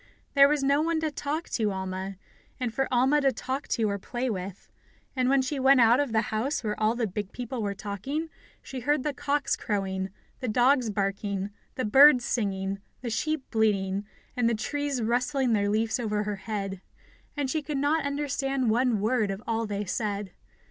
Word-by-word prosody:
There 280 Hz, -1 st, +8 dB
was 295 Hz, -2 st, +1 dB
no 280 Hz, +2 st, +3 dB
one 330 Hz, 0 st, +1 dB
to 315 Hz, -1 st, -1 dB
talk 295 Hz, +3 st, -3 dB
to 215 Hz, -3 st, 0 dB
Alma 190 Hz, 0 st, -4 dB, 0.4 s
and 245 Hz, -3 st, -2 dB
for 270 Hz, +1 st, 0 dB
Alma 265 Hz, +4 st, +4 dB
to 270 Hz, -1 st, +4 dB
talk 260 Hz, +3 st, -4 dB
to 225 Hz, -3 st, +1 dB
or 200 Hz, -1 st, -2 dB
to -, -, -21 dB
play 250 Hz, 0 st, -1 dB
with. 190 Hz, -1 st, -6 dB, 0.5 s
And 255 Hz, -1 st, +2 dB
when 270 Hz, -1 st, +4 dB
she 275 Hz, +2 st, -2 dB
went 265 Hz, 0 st, +6 dB
out 235 Hz, +2 st, +6 dB
of 285 Hz, -4 st, 0 dB
the 220 Hz, -1 st, +3 dB
house 250 Hz, +6 st, -1 dB
where 210 Hz, -1 st, -1 dB
all 220 Hz, +1 st, +2 dB
the 240 Hz, -1 st, 0 dB
big 205 Hz, 0 st, -4 dB
people 245 Hz, 0 st, -5 dB
were 200 Hz, -1 st, -2 dB
talking, 240 Hz, -, -4 dB, 0.3 s
she 265 Hz, -, -6 dB
heard 290 Hz, +2 st, +1 dB
the 295 Hz, -, -1 dB
cocks 290 Hz, +1 st, 0 dB
crowing, 190 Hz, -2 st, -2 dB, 0.3 s
the 255 Hz, -, -3 dB
dogs 245 Hz, +2 st, +3 dB
barking, 200 Hz, 0 st, -2 dB, 0.2 s
the 255 Hz, -, -1 dB
birds 265 Hz, +3 st, +7 dB
singing, 195 Hz, -3 st, -1 dB, 0.2 s
the 240 Hz, -2 st, -4 dB
sheep 310 Hz, +5 st, -1 dB
bleating, 200 Hz, -3 st, +1 dB, 0.3 s
and 245 Hz, -2 st, +2 dB
the 235 Hz, -, +1 dB
trees 280 Hz, +2 st, -2 dB
rustling 250 Hz, +2 st, +1 dB
their 205 Hz, -1 st, +2 dB
leaves 220 Hz, +4 st, +1 dB
over 210 Hz, -3 st, -1 dB
her 205 Hz, -1 st, -3 dB
head, 195 Hz, -2 st, -4 dB, 0.6 s
and 275 Hz, -2 st, -1 dB
she 315 Hz, -, 0 dB
could 295 Hz, -1 st, -3 dB
not 290 Hz, +3 st, +2 dB
understand 275 Hz, -3 st, 0 dB
one 240 Hz, -2 st, +2 dB
word 220 Hz, -1 st, +1 dB
of 195 Hz, +3 st, -4 dB
all 225 Hz, -1 st, -1 dB
they 205 Hz, 0 st, -3 dB
said. 205 Hz, -1 st, -2 dB
235 Hz, 195 wpm, -27 LUFS, 205-275 Hz, 0.6 s, There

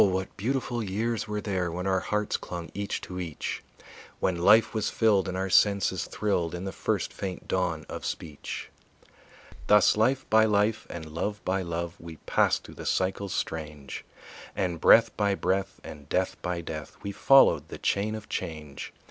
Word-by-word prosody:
what 95 Hz, -1 st, 0 dB
beautiful 120 Hz, +2 st, -1 dB
years 110 Hz, +2 st, -1 dB
were 105 Hz, 0 st, -2 dB
there 95 Hz, -5 st, -1 dB
When 90 Hz, +2 st, -4 dB
our 95 Hz, -1 st, +2 dB
hearts 105 Hz, 0 st, -1 dB
clung 85 Hz, -1 st, -6 dB
each 100 Hz, 0 st, -3 dB
to 90 Hz, 0 st, -6 dB
each; 85 Hz, -4 st, -4 dB, 0.6 s
When 95 Hz, -, +1 dB
life 105 Hz, +6 st, +5 dB
was 110 Hz, -2 st, 0 dB
filled 105 Hz, -4 st, +3 dB
and 95 Hz, 0 st, -3 dB
our 95 Hz, 0 st, -2 dB
senses 100 Hz, -1 st, +3 dB
thrilled 90 Hz, -6 st, -1 dB
In 90 Hz, -, -5 dB
the 95 Hz, -, -3 dB
first -, -, -2 dB
faint 95 Hz, -2 st, -5 dB
dawn 85 Hz, -5 st, -1 dB
of -, -, -6 dB
speech. 75 Hz, -4 st, -5 dB, 1.0 s
Thus 105 Hz, -1 st, +6 dB
life 130 Hz, +5 st, +2 dB
by 110 Hz, 0 st, +5 dB
life 105 Hz, +1 st, +1 dB
and 85 Hz, -2 st, -6 dB
love 105 Hz, +6 st, -3 dB
by 95 Hz, +1 st, +1 dB
love 85 Hz, -1 st, -4 dB
We 85 Hz, -1 st, -9 dB
passed -, -, +2 dB
through -, -, -11 dB
the -, -, -7 dB
cycles 95 Hz, +1 st, 0 dB
strange, 75 Hz, -4 st, -4 dB, 0.5 s
And 85 Hz, -4 st, -1 dB
breath 115 Hz, -, +6 dB
by 100 Hz, -2 st, +1 dB
breath 95 Hz, 0 st, -1 dB
and 75 Hz, -1 st, -10 dB
death 95 Hz, 0 st, 0 dB
by 90 Hz, -1 st, -2 dB
death 80 Hz, -3 st, -7 dB
We 100 Hz, -, -3 dB
followed 135 Hz, +7 st, +5 dB
the -, -, -8 dB
chain 105 Hz, +2 st, 0 dB
of 110 Hz, -1 st, -8 dB
change. 75 Hz, -5 st, -5 dB
95 Hz, 175 wpm, -28 LUFS, 85-105 Hz, 1.0 s, Thus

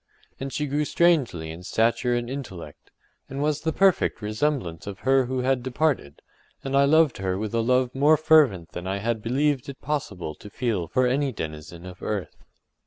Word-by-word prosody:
And 135 Hz, 0 st, -4 dB
she 150 Hz, -, -2 dB
grew 145 Hz, +2 st, 0 dB
strangely 140 Hz, -, +1 dB
in 80 Hz, +2 st, -9 dB
stature 115 Hz, +5 st, +1 dB
and 120 Hz, 0 st, -2 dB
intellect, 95 Hz, -, -8 dB, 0.4 s
and 135 Hz, -, -5 dB
was 150 Hz, 0 st, 0 dB
the 160 Hz, -, 0 dB
perfect 195 Hz, +2 st, +2 dB
resemblance 105 Hz, -, -2 dB
of 100 Hz, -1 st, -7 dB
her 135 Hz, 0 st, +3 dB
who 130 Hz, 0 st, -1 dB
had 130 Hz, 0 st, +1 dB
departed, 130 Hz, -, -1 dB, 0.4 s
and 135 Hz, 0 st, -2 dB
I 140 Hz, 0 st, +5 dB
loved 155 Hz, -1 st, +4 dB
her 95 Hz, -1 st, -1 dB
with 105 Hz, +1 st, -4 dB
a 115 Hz, -, +2 dB
love 125 Hz, +1 st, +2 dB
more 145 Hz, +3 st, +4 dB
fervent 145 Hz, -, +4 dB
than 90 Hz, +1 st, -6 dB
I 95 Hz, +1 st, -1 dB
had 110 Hz, +2 st, -2 dB
believed 135 Hz, +3 st, 0 dB
it 140 Hz, -, -8 dB
possible 105 Hz, -, -3 dB
to 105 Hz, -, -12 dB
feel 105 Hz, -7 st, -2 dB
for 130 Hz, +10 st, +1 dB
any 135 Hz, +2 st, +1 dB
denizen 80 Hz, -2 st, -7 dB
of 90 Hz, 0 st, -10 dB
earth. 105 Hz, -4 st, -3 dB
125 Hz, 185 wpm, -25 LUFS, 95-140 Hz, 0.4 s, I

